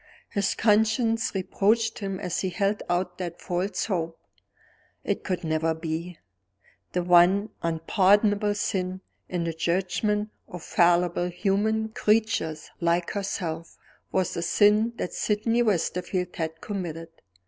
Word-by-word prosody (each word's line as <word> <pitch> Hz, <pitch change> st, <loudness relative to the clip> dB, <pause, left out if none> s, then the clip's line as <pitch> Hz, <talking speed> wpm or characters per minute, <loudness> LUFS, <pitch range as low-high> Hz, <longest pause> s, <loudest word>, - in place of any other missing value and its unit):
His 200 Hz, -1 st, 0 dB
conscience 225 Hz, +1 st, +2 dB
reproached 220 Hz, +5 st, +1 dB
him 195 Hz, -3 st, -4 dB
as 180 Hz, -1 st, -2 dB
he 190 Hz, -, -1 dB
held 200 Hz, +2 st, 0 dB
out 180 Hz, +1 st, -1 dB
that 175 Hz, -2 st, -5 dB
false 180 Hz, +2 st, -2 dB
hope. 165 Hz, -5 st, -2 dB, 0.9 s
It -, -, -2 dB
could 185 Hz, -2 st, -2 dB
never 160 Hz, 0 st, 0 dB
be! 160 Hz, +2 st, -4 dB, 0.8 s
The 180 Hz, -, 0 dB
one 180 Hz, +4 st, +5 dB
unpardonable 205 Hz, +5 st, +2 dB
sin, 185 Hz, -2 st, -2 dB, 0.3 s
in 175 Hz, -2 st, -1 dB
the 165 Hz, -1 st, -2 dB
judgment 195 Hz, +5 st, 0 dB, 0.2 s
of 180 Hz, -2 st, -9 dB
fallible 175 Hz, 0 st, +3 dB
human 210 Hz, +4 st, 0 dB
creatures 210 Hz, -8 st, 0 dB
like 170 Hz, 0 st, +1 dB
herself, 170 Hz, -5 st, -4 dB, 0.3 s
was 185 Hz, -1 st, 0 dB
the 170 Hz, -, -3 dB
sin 210 Hz, +6 st, +3 dB
that 180 Hz, -, -4 dB
Sydney 225 Hz, +3 st, +1 dB
Westerfield 180 Hz, -3 st, -1 dB
had 160 Hz, -1 st, -3 dB
committed. 170 Hz, -5 st, -5 dB
185 Hz, 125 wpm, -26 LUFS, 170-210 Hz, 0.9 s, one